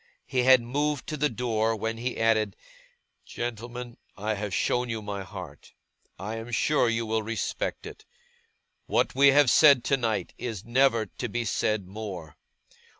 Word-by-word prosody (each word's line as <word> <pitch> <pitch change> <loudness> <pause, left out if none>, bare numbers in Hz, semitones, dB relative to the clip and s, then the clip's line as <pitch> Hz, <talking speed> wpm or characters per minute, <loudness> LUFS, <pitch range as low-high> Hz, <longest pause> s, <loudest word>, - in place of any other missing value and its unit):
He 130 - -2
had 130 -1 +6
moved 145 +3 -1
to 155 - -2
the 150 0 +1
door, 115 -2 0
when 110 +1 -3
he 125 +2 -3
added: 110 -3 +2 0.7
'Gentlemen, 120 +1 -6 0.2
I 105 +1 -1
have 105 -1 -4
shown 125 +5 0
you 115 -1 -2
my 100 -1 -4
heart. 90 -7 -10 0.4
I 105 +5 -5
am 115 +1 -7
sure 125 +1 +2
you 115 0 -1
will 110 0 0
respect 110 -1 -3
it. - - -10 0.8
What - - +1
we 140 +2 +5
have 140 -2 +6
said 140 -3 +7
tonight 120 -6 0
is 110 -6 -5
never 120 -2 +3
to 120 - -6
be 120 +2 -2
said 105 -1 0
more. 95 -6 -7
115 Hz, 155 wpm, -27 LUFS, 110-125 Hz, 0.8 s, said